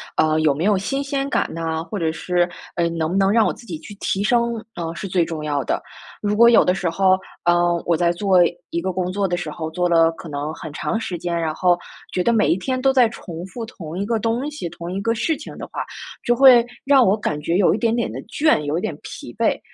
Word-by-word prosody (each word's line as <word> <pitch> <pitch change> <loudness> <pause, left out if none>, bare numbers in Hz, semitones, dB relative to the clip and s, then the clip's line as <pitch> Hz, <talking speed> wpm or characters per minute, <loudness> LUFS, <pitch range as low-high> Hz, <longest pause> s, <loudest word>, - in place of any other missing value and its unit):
呃， 155 0 +2
有 155 -2 +3
没 150 +4 -3
有 205 -1 +3
新 270 +9 -2
鲜 275 -1 -2
感 - - 0
呐， 160 -1 -3
或 205 +5 -6
者 165 -4 0
是， 175 +2 0 0.3
呃， 170 -1 +1
能 165 -1 -2
不 190 - 0
能 195 0 +3
让 225 0 +4
我 - - +1
自 - - -12
己 165 -8 -6
去 205 +6 -11
提 195 0 -1
升， 235 0 +1
呃， 165 -1 -4
是 190 +3 -6
最 180 -2 +1
重 160 -2 -5
要 145 -2 -1
的。 - - -1 0.4
如 210 0 0
果 235 +2 +7
有 235 -1 +7
的 180 - +2
时 190 -2 -2
候， 190 +2 +3 0.3
呃， 175 0 +3
我 170 -2 +2
在 170 0 +2
做 190 +1 +2 0.3
一 170 - -2
个 185 +2 -2
工 180 0 -2
作 195 +1 0
的 175 - -1
时 160 - -4
候， 160 +1 -5
做 180 +2 0
了 165 -1 +5
可 165 0 -10
能 145 +1 -4
很 155 -1 -8
长 220 +8 -2
时 185 -6 -4
间， 175 0 -3
然 160 -2 -2
后 180 0 +3 0.4
觉 180 - 0
得 235 - +3
每 225 -2 +3
一 - - +3
天 255 +7 -2
都 270 +1 +3
在 250 -3 +5
重 170 -6 -8
复 230 +4 -6
同 170 -7 -8
一 200 - -1
个 225 +1 0
东 230 +5 -1
西， 235 - -5
同 175 +1 -7
一 195 - -3
个 230 +2 0
事 310 +8 0
情 300 - -10
的 - - -6
话， - - -2 0.4
就 240 - +2
会 255 -2 +8 0.2
让 275 -1 +6
我 200 +1 +3
感 150 -8 -3
觉 165 +3 0
有 195 - +4
一 - - 0
点 230 -1 +1
点 235 - -1
的 - - -6
倦， 310 +6 +2
有 150 +2 -2
一 - - -2
点 - - -3
疲 - - -9
惫。 - - +2
185 Hz, 285 characters per minute, -21 LUFS, 165-230 Hz, 0.4 s, 会